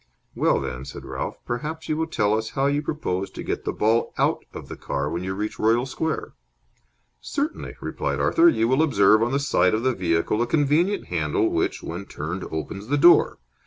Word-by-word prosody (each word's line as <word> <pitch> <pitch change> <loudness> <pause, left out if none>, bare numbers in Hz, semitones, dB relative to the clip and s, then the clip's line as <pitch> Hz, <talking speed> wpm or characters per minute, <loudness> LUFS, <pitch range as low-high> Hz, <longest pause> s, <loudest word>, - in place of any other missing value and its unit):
"Well, - - +2
then," 60 +1 -5
said 70 - -9
Ralph, - - -4
"perhaps 150 +7 -4
you 155 - 0
will 160 +1 -1
tell 105 -10 +1
us 110 0 -2
how 135 - +2
you 145 +1 +1
propose 100 - -3
to - - -8
get - - -3
the - - 0
ball 115 +2 +1
out - - +1
of - - -9
the - - -7
car 70 +2 -3
when 85 +2 -3
you 95 0 -3
reach 105 +2 -4
Royal 115 +3 +3
Square?" 155 +4 -3 0.9
"Certainly," 285 - -3
replied - - -3
Arthur. 340 +1 +5
"You 115 - +1
will 130 +5 +3
observe 110 -8 +4
on 120 +1 +1
the 135 - +2
side 110 -9 +2
of 110 - -2
the 130 0 +2
vehicle 90 +3 0
a 120 - +1
convenient 160 +8 +2
handle 80 -4 +1
which, - - -1
when 85 +4 -5
turned, 85 +4 -5
opens 95 +6 -5
the 145 +3 +1
door. 175 +5 +6
115 Hz, 200 wpm, -24 LUFS, 95-145 Hz, 0.9 s, door